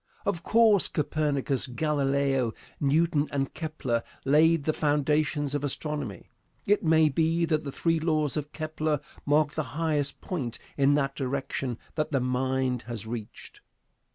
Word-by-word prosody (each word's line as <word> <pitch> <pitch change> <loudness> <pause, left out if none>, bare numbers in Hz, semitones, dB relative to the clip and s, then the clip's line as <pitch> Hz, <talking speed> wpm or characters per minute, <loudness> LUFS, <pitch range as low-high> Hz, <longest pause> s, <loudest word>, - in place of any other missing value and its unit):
Of 185 -4 -1
course 220 -1 +4
Copernicus, 145 -3 -1
Galileo, 135 -3 +1 0.3
Newton 150 +1 +2
and 135 -1 -1
Kepler 155 -7 -2 0.2
laid 155 +3 +4
the 155 - +1
foundations 150 -1 +1
of 145 -1 -1
astronomy. 145 - -4 0.3
It 205 +1 +3
may 160 -1 +5
be 165 +3 +2
that 155 -2 0
the 140 - -5
three 165 +3 +1
laws 155 -3 +1
of 150 -1 -3
Kepler 155 -1 -1 0.3
mark 150 0 +3
the 155 - -1 0.2
highest 150 -4 0
point 135 -11 -4 0.2
in 140 0 +4
that 140 -1 +1
direction 130 -2 -3 0.2
that 155 0 -2
the 135 - +2
mind 130 0 0
has 115 -3 -5
reached. 110 -2 -7
145 Hz, 140 wpm, -28 LUFS, 135-155 Hz, 0.3 s, may